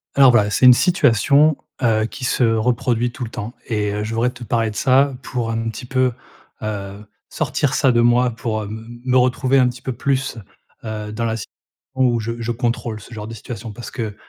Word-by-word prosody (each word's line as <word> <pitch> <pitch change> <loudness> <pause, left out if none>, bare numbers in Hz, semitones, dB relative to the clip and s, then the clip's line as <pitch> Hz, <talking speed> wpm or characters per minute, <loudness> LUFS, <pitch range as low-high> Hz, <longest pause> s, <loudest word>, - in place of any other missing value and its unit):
Alors 135 -2 +7
voilà, 105 -4 +3
c'est 105 - +2
une 125 - +10
situation, 145 - +3 0.3
heu, 110 -2 +3
qui 125 +3 -8
se 125 - +1
reproduit 120 +1 +1
tout 125 - -6
le 115 - -5
temps 110 +1 -6
et 105 -3 -1
heu, 105 0 -2
je 110 +2 -4
voudrais 120 +2 +2
te 125 -1 -11
parler 115 -1 0
de - - -12
ça 135 +3 +3
pour 120 -3 -3
un 115 0 -2
petit 115 +3 -7
peu, 130 0 +1 0.5
heu, 100 -1 -5 0.2
sortir 145 -2 -1
ça 140 -5 +3
de 120 -1 +3
moi, 120 +1 +3
pour, 115 -1 -3
heu, - - -7
me 110 +2 -8 0.2
me 130 - +5
retrouver 130 +1 +2
un 125 - +4
petit 125 0 -9
peu 130 - -3
plus, 135 -1 -1 0.5
heu, 105 -1 -5
dans 115 +2 -2
la 115 0 -1
sit 105 - -6 0.5
on 130 0 +3
où 120 -2 +2
je 115 +1 -3
je 115 0 -2
contrôle 115 -2 -2
ce 115 +3 -13
genre 105 -1 -6
de 115 - -7
situation. 115 0 -7
Parce 120 +3 -9
que 110 -4 -4
120 Hz, 225 wpm, -20 LUFS, 110-125 Hz, 0.5 s, une